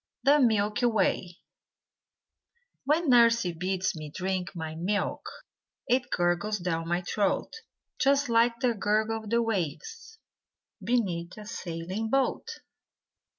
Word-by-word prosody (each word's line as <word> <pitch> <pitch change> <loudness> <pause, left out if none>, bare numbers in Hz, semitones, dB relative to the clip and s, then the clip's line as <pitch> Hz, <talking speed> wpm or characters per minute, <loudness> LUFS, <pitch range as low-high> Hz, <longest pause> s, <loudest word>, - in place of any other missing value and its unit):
THE 285 +2 +5
MILKY 220 -1 +2
WAY 190 -5 0 1.5
When 310 +4 +2
nursey 230 -6 +4
bids 185 +3 -1
me 155 -1 -7
drink 185 +3 -3
my 160 -2 -5
milk 190 +6 -2 0.6
It 250 0 +1
gurgles 175 +5 0
down 165 -3 -2
my 175 +1 -1
throat 200 +2 -1 0.5
Just 280 +1 +3
like 235 +1 +2
the 250 -2 +2
gurgle 215 +2 0
of - - -8
the 235 +1 +2
waves 225 - -4 0.7
Beneath 185 -6 -1
a 210 - -9
sailing 185 +1 -5
boat. 270 - 0
210 Hz, 115 wpm, -28 LUFS, 180-235 Hz, 1.5 s, THE